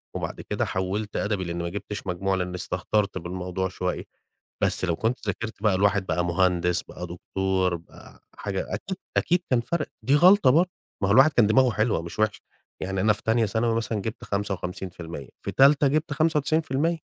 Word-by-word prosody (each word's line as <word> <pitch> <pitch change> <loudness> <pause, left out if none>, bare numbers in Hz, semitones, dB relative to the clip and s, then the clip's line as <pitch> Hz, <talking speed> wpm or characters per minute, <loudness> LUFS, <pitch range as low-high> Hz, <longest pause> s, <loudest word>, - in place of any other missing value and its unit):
وبعد - - -4
كده - - -2
حولت 95 +3 -3
أدبي 100 -3 -1
لإن 85 0 -3
ما 85 - -2
جبتش 100 +2 -6
مجموع، 95 +2 0
لإني 90 -1 -3
استهترت 100 +2 -1
بالموضوع 90 +1 -3
شوية، 90 0 -3 0.6
بس - - +1
لو 85 -2 0
كنت 115 +3 -2
ذاكرت 110 +1 -4
بقى 105 -3 +4
الواحد 100 0 +2
بقى 85 0 0
مهندس، 90 0 +2
بقى 90 - -8
دكتور، 95 +1 -1
بقى 85 0 -14
حاجة، 95 -2 -4
أكيد، 190 - -5 0.2
أكيد 175 0 +2
كان 125 -2 +4
فرق. 155 +6 -2 0.2
دي 140 +3 +3
غلطة 180 -2 +6
برضه، 170 +6 +4 0.3
ما - - +3
هو - - +4
الواحد 135 +6 +7
كان 115 -4 +5
دماغه 125 +4 +4
حلوة 110 -4 +1
مش 85 +4 -9
وحشة، 110 -1 +1 0.4
يعني 95 0 -2
أنا 105 +2 +4
في 105 - -9
تانية 115 0 +2
ثانوي 115 +3 0
مثلًا 115 -1 -1
جبت 110 +3 -5
55%، 90 -6 -4
في - - -3
تالتة 140 +1 +5
جبت 150 +1 0
95%. 155 +1 +1
100 Hz, 180 wpm, -25 LUFS, 90-125 Hz, 0.6 s, الواحد